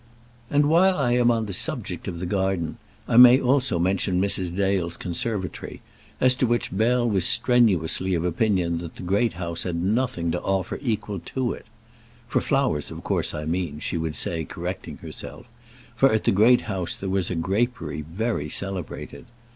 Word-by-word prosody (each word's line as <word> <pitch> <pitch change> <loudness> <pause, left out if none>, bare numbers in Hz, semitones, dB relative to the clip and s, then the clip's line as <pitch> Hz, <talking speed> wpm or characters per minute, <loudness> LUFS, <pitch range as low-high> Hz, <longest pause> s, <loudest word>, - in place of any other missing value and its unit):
And 145 0 +3
while 180 +5 +4
I 130 -4 +1
am 120 -1 +3
on 115 -2 +1
the 100 - -5
subject - - 0
of 85 -3 -5
the 90 - -4
garden 95 -3 -1 0.3
I 115 - +2
may 125 +1 +9
also 130 -6 +1
mention 90 +1 +1
Mrs. 95 -2 +1
Dale's 95 -3 0
conservatory, 95 +2 -4 0.4
as 130 0 +5
to 125 0 0
which 120 -5 -1
Bell 120 +3 +2
was 100 -5 +1
strenuously 95 -6 +2
of 85 0 -1
opinion 90 -2 0
that 85 -1 -8
the - - -9
Great 100 +6 +1
House 85 -1 -4
had 90 -2 -2
nothing 90 -2 0
to - - -2
offer 95 -1 -2
equal 110 -6 -2
to 130 -2 -2
it - - -12 0.6
"For - - 0
flowers, 135 - 0
of - - -9
course, - - -1
I 75 0 -5
mean," 85 -2 -2
she 75 - -3
would 80 -2 -2
say, 80 +3 -1
correcting - - -6
herself; - - -9 0.5
for 135 +3 +4
at 110 -1 +1
the - - +3
Great 115 +6 +5
House 95 -5 -3
there 95 - -6
was 95 -2 0
a 90 - -2
grapery 100 +3 -1
very 80 0 -3
celebrated. 95 -2 -3
95 Hz, 180 wpm, -24 LUFS, 85-120 Hz, 0.6 s, may